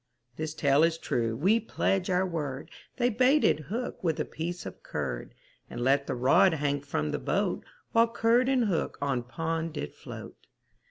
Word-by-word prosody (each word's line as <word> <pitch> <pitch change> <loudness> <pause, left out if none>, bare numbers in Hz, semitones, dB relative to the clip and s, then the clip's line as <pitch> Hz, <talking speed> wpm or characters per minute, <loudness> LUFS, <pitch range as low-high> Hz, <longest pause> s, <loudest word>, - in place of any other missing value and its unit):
This 155 +1 -4
tale 140 0 +3
is 165 0 +3
true 115 -7 -1
we 190 - +3
pledge 195 -4 0
our 185 +1 +2
word, 150 -6 -4 0.3
They 245 -1 +3
baited 255 - +4
hook 240 +1 -4
with 160 -3 0
a - - 0
piece 175 +2 -5
of - - -8
curd, - - -4 0.3
And 120 - -6
let 140 +3 +2
the - - -1
rod 135 +8 +4
hang 145 -1 0
from 75 - -2
the - - -2
boat, - - -1 0.3
While 230 0 +5
curd 230 +2 +2
and 255 -3 +3
hook 185 -6 -1
on 140 -3 0
pond 160 +6 -3
did 75 - -5
float. - - -10
160 Hz, 175 wpm, -29 LUFS, 140-205 Hz, 0.3 s, While